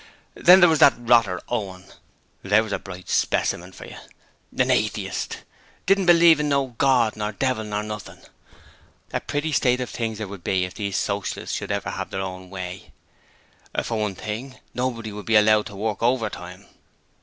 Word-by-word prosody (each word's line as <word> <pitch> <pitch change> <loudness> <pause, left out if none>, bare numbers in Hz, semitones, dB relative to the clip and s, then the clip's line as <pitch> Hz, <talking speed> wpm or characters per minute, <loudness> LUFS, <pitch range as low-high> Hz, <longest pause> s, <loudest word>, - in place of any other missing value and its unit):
Then 185 +2 +7
there 175 - +8
was 160 -2 +2
that 140 - +7
rotter 115 -6 +3
Owen; 95 -6 -4 0.6
there 105 +3 +3
was 110 - -7
a - - -1
bright 95 -1 -10
specimen 90 +2 0
for - - -11
yer! - - -10 0.6
An - - +3
Atheist! - - -2 0.4
didn't 195 -1 +2
believe 170 -2 +7
in 150 0 0
no 140 -3 0
God 130 -5 +3
or 105 0 -1
Devil 110 -3 -2
or 105 0 -1
nothing 105 -1 -7
else. - - -20 0.8
A - - 0
pretty 145 +2 -3
state 125 -3 +2
of 125 - -4
things 115 -2 -3
there 110 -1 -5
would 95 -3 -10
be 95 -1 +1
if 90 - -9
these 100 -3 -3
Socialists 100 -1 -2
could - - -7
have - - -3
their 95 - -4
own 95 -1 -6
way: 95 -1 -7 0.9
for 115 -2 -3
one 105 -3 -2
thing, 115 +7 -6 0.2
nobody 120 -3 -3
would 105 0 -9
be 115 - +2
allowed 105 0 +5
to 100 - -10
work 105 +1 -3
overtime! 105 -6 -2
110 Hz, 180 wpm, -23 LUFS, 100-130 Hz, 0.9 s, there